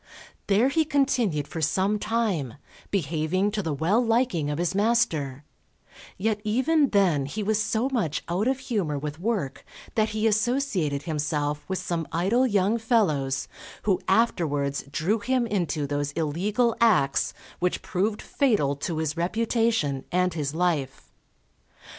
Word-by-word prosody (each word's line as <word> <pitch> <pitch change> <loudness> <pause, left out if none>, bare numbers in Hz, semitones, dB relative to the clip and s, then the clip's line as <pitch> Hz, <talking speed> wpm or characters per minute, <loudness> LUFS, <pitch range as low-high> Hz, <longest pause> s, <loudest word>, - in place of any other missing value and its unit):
There 210 +6 +4
he 315 +3 +2
continued 255 - +1
for 165 - -5
some 195 +7 +1
time, 200 - -1 0.3
behaving 175 +3 0
to 210 0 -1
the 165 -5 -3
well 170 - +2
liking 225 - +1
of 145 - -2
his 175 +2 0
master; 165 - +1 0.7
yet 210 +1 -1
even 265 +7 +2
then 175 -9 +2
he 210 +9 -4
was 215 +1 +1
so 220 +3 0
much 225 - -1
out 185 +7 0
of 265 0 +1
humour 205 - -2
with 150 +2 -5
work 185 - -2 0.3
that 215 -1 +2
he 215 +1 -1
associated 215 - +1
himself 150 -2 -2
with 190 - -2
some 170 -3 -3
idle 215 +10 +2
young 205 +1 +2
fellows 155 - +1 0.4
who 195 -4 +1
afterwards 150 -10 +1
drew 185 +10 0
him 255 +2 +1
into 175 -8 -1
those 145 0 -2
illegal 200 +10 0
acts 185 -12 +3 0.2
which 180 0 -1
proved 205 +4 -1
fatal 210 - +1
to 160 +3 -3
his 155 -1 -1
reputation 215 - 0
and 180 0 +1
his 150 -2 -3
life. 160 -6 -1
185 Hz, 140 wpm, -26 LUFS, 150-225 Hz, 0.7 s, There